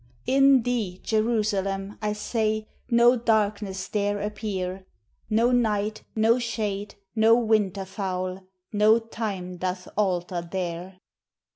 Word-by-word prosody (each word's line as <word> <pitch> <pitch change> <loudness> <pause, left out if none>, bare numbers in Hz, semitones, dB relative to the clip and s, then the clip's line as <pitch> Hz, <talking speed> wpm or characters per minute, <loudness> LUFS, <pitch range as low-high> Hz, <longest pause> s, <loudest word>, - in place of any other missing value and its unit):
In 270 -1 +5
thee, 220 -7 -2
Jerusalem, 210 -3 0
I 210 -1 0
say, 215 0 -1 0.2
No 240 +1 +6
darkness 210 -4 0
dare 205 -1 0
appear 195 -3 -4 0.4
No 230 +3 +3
night, 215 -3 0
no 225 +2 +4
shade, 210 -3 -3 0.2
no 225 +1 +6
winter 210 -5 +1
foul 185 -1 -4 0.3
No 210 +2 +5
time 205 -6 -5
doth 185 +1 -3
alter 180 -3 0
there. 180 +1 -5
210 Hz, 110 wpm, -26 LUFS, 190-225 Hz, 0.4 s, No